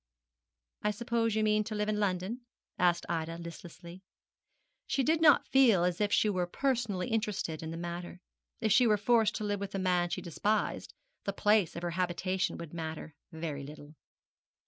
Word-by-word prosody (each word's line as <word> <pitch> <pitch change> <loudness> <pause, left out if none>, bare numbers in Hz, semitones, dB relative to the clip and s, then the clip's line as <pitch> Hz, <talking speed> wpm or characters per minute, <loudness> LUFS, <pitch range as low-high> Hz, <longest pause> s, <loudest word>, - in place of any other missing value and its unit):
'I 210 - +1
suppose 230 0 -1
you 215 - +2
mean 215 0 +3
to 215 0 -4
live 210 0 -1
in 210 -1 0
London?' 200 +4 -1 0.4
said 175 -1 +3
Ida, 165 0 -2
listlessly. 170 +1 -10 0.9
She 270 - +1
did 315 +4 +2
not 300 -3 +6
feel 235 -10 +5
as 180 +2 0
if 205 -1 +1
she 215 - +3
were 185 -4 0
personally 230 -4 -1
interested 210 -8 -2
in 160 - -5
the 165 - -5
matter. 175 +1 -6 0.4
If 220 -2 +1
she 240 +4 +6
were 210 -1 +4
forced 220 0 +3
to - - -3
live 205 -1 -1
with 200 0 -5
a - - 0
man 180 -2 +1
she - - -2
despised, 205 +5 -1 0.3
the 200 - -1
place 205 -3 +2
of 170 - -6
her 175 - -1
habitation 185 +1 -1
would 170 -2 -8
matter 160 -1 -6 0.2
very 160 -3 -5
little. 145 +1 -11
190 Hz, 180 wpm, -31 LUFS, 170-215 Hz, 0.9 s, not